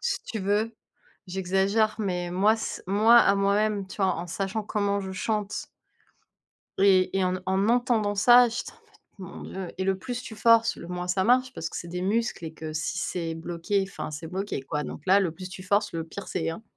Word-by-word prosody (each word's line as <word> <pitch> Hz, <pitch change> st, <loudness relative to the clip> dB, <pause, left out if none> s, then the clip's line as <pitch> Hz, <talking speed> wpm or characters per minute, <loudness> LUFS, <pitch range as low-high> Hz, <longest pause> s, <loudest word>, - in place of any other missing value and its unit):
Si 485 Hz, -, -2 dB
tu 220 Hz, -, -5 dB
veux, 210 Hz, +4 st, 0 dB, 0.5 s
j'exagère, 195 Hz, +4 st, +1 dB
mais 180 Hz, -4 st, -2 dB
moi 205 Hz, +5 st, +3 dB
c 220 Hz, -, -5 dB
moi 215 Hz, +5 st, +5 dB
à 215 Hz, -4 st, +6 dB
moi-même, 200 Hz, 0 st, +1 dB
tu 190 Hz, -, -10 dB
vois, 190 Hz, -1 st, +2 dB
en 170 Hz, +1 st, -5 dB
sachant 195 Hz, +5 st, -3 dB
comment 200 Hz, -1 st, -1 dB
je 190 Hz, -1 st, -6 dB
chante 210 Hz, +1 st, -2 dB, 1.1 s
et 190 Hz, -1 st, +4 dB
et 190 Hz, -, +2 dB
en 185 Hz, 0 st, 0 dB
en 190 Hz, +2 st, +1 dB
entendant 235 Hz, -4 st, +2 dB
ça, 240 Hz, +4 st, +7 dB
j'étais 235 Hz, +1 st, -5 dB
en -, -, -21 dB
mode: -, -, -27 dB, 0.3 s
«Mon -, -, -9 dB
Dieu» 190 Hz, -1 st, -6 dB
et 190 Hz, -, -1 dB
le 190 Hz, 0 st, +1 dB
plus 245 Hz, +4 st, -5 dB
tu 220 Hz, -, -8 dB
forces, 230 Hz, +1 st, +4 dB
le 170 Hz, -, -9 dB
moins 180 Hz, 0 st, -4 dB
ça 185 Hz, +1 st, +1 dB
marche, 255 Hz, +3 st, +3 dB
parce 165 Hz, -, -4 dB
que -, -, -7 dB
c'est 170 Hz, -, -6 dB
des 180 Hz, +1 st, -4 dB
muscles 215 Hz, -2 st, -1 dB
et 160 Hz, -, -6 dB
que 160 Hz, 0 st, -7 dB
si 155 Hz, -, -2 dB
c'est 165 Hz, -2 st, -3 dB
bloqué, 170 Hz, +4 st, -1 dB
enfin, 195 Hz, -, -6 dB
c'est 155 Hz, +2 st, -7 dB
bloqué, 190 Hz, -2 st, -3 dB
quoi. 150 Hz, +2 st, -3 dB
Donc -, -, -7 dB
là, 190 Hz, +2 st, +6 dB
le 185 Hz, -4 st, 0 dB
plus 185 Hz, +2 st, -8 dB
tu 185 Hz, 0 st, -9 dB
forces, 205 Hz, +3 st, +1 dB
le 165 Hz, -1 st, -3 dB
pire 190 Hz, +4 st, -9 dB
c'est, 165 Hz, -2 st, -2 dB
hein. 165 Hz, +7 st, -7 dB
195 Hz, 220 wpm, -26 LUFS, 180-215 Hz, 1.1 s, ça